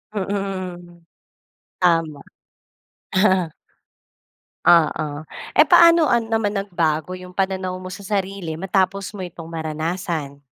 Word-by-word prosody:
Mhm, 185 -3 -4 0.7
tama. 165 -5 +2 2.5
Oo. 155 -3 +3 0.3
Eh, - - +8
paano 335 -1 +6
an 235 -1 +2
naman 225 -2 0
nagbago 170 -3 -1
yung 180 0 -10
pananaw 190 -1 -2
mo 185 - -8
sa 190 +2 -8
sarili 190 -5 -3
matapos 195 +2 0
mo 190 - -5
itong 170 -2 -8
maranasan? 160 -2 -4
185 Hz, 95 wpm, -21 LUFS, 165-195 Hz, 2.5 s, Eh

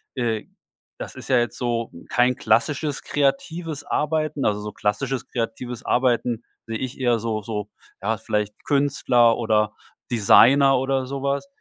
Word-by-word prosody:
äh, 115 -4 -1 0.5
das - - -7
ist - - -10
ja 130 - +5
jetzt 120 -2 -2
so 120 -2 -2 0.2
kein 125 +1 +3
klassisches, 140 +7 0
kreatives 150 +2 -1
Arbeiten. 155 -1 -1
Also 105 -1 +1
so 105 0 -6
klassisches 125 +6 -2
kreatives 120 0 -4
Arbeiten 120 -2 +1 0.2
sehe 115 0 -3
ich 130 +1 -5
eher 120 -2 +2
so 110 -1 -2
so 105 -1 -5 0.3
ja, - - 0
vielleicht 105 0 -3
Künstler 135 -5 +3
oder 105 -2 +1 0.4
Designer 135 +5 +6
oder 135 0 0
so 140 0 -5
was. 140 - -1
125 Hz, 145 wpm, -23 LUFS, 115-135 Hz, 0.5 s, Designer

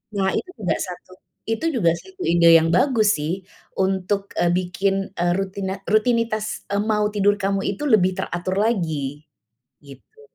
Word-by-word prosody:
Nah, 190 -1 +1
itu 365 - -3
juga 180 -6 0
satu 180 +1 -10 0.4
itu 225 +8 -2
juga 175 -9 +3
satu 380 - -14
ide 170 -1 +4
yang 165 +1 0
bagus 215 - +3
sih, 150 +2 -2 0.5
untuk 190 +1 0 0.2
eee, 175 - +2
bikin 185 +2 0 0.3
eee, 175 0 +2
rutina 195 0 -3 0.2
rutinitas 215 0 +1 0.2
eee, 200 0 0
mau 210 0 +2
tidur 205 -1 +2
kamu 195 0 0
itu 200 - -7
lebih 190 -5 +4
teratur 180 +2 -3
lagi, 155 - -2 0.6
gitu. 140 - -16
195 Hz, 150 wpm, -22 LUFS, 175-215 Hz, 0.6 s, ide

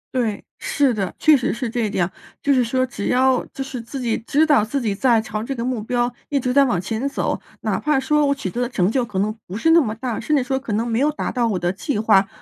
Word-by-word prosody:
对， 230 -5 -1 0.2
是 280 -4 +1
的， 195 -4 -2
确 310 -2 +6
实 250 - -1
是 245 0 -3
这 230 -1 -1
一 - - -1
点， 180 -2 0 0.3
就 285 - +3
是 255 -2 +3
说 255 +2 +1
只 225 -5 -6
要 255 0 +3
就 270 - -4
是 265 -2 -6
自 230 +4 -8
己 235 -2 0
知 300 +3 +3
道 295 -8 +4
自 275 +5 -2
己 215 -4 0
在 230 +2 +3
朝 215 -1 -4
这 270 +5 -4
个 230 - -3
目 250 -2 -2
标 240 +2 -1
一 285 - 0
直 250 -1 0
在 280 +2 +5
往 200 -9 0
前 225 +7 -2
走， 280 - -2 0.2
哪 - - -1
怕 300 -2 +1
说 295 +3 +2
我 280 0 +2
取 200 -9 -4
得 245 +6 -2
的 - - -1
成 195 -5 +1
就 255 0 +1
可 200 -4 -4
能 210 +2 0
不 185 - -7
是 325 +10 +2
那 335 - +7
么 220 -8 -1
大， 235 0 -3
甚 300 +6 0
至 270 - +2
说 265 +1 -1
可 230 -5 -5
能 225 +3 0
没 230 0 0
有 295 +2 +3
达 - - -3
到 240 -2 +1
我 205 - 0
的 175 0 0
计 210 +5 -3
划 210 -3 +4
245 Hz, 305 characters per minute, -21 LUFS, 220-270 Hz, 0.3 s, 那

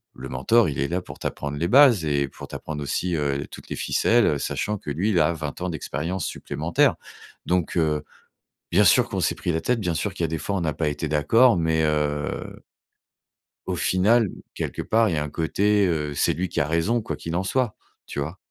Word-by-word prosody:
le 65 +1 -8
mentor, 95 - +3
il 70 - -4
est 70 - 0
là 90 +2 -1
pour - - -11
t'apprendre 70 0 -4
les 85 +3 0
bases 130 - +6
et 70 -2 +1
pour - - -10
t'apprendre 75 -2 -5
aussi, 90 +5 -1
heu, 70 -2 -1
toutes - - -11
les - - -4
ficelles, 120 -1 +2
heu, 75 - +2
sachant 105 +8 -2
que 85 - -8
lui, 90 +9 0
il 90 - +3
a 75 - +3
20 75 -1 -6
ans 90 - -1
d'expérience 85 +3 -3
supplémentaire, - - 0 0.5
donc 90 -1 0
heu, 75 -2 +1 0.7
bien 100 +4 +5
sûr 80 - +5
qu'on - - -2
s'est - - +1
pris 90 - -2
la 80 - 0
tête, 125 -1 0
bien 90 -3 -1
sûr 95 +5 -2
qu'il 85 - -4
y - - +4
a - - -1
des 80 - -2
fois, 100 - -3
on 90 - -2
a 80 - 0
pas 80 +1 -1
été 75 +2 -3
d'accord, 95 - +4
mais 80 -1 +1
heu 75 -1 -2 1.1
au - - -2
final, 105 +4 +3 0.3
quelque - - -4
part, 115 0 +2
il 85 - -1
y 75 - 0
a 75 - -1
un 75 - -6
côté, 100 +5 +2
heu, 75 -4 -1
c'est 70 - +1
lui 90 +3 -2
qui - - -2
a 70 - +2
raison, 85 +9 +1
quoi - - -4
qu'il 85 0 -5
en 95 - -1
soit, 120 +2 0 0.3
tu 70 - -4
vois? 80 +6 -5
85 Hz, 230 wpm, -24 LUFS, 75-100 Hz, 1.1 s, bases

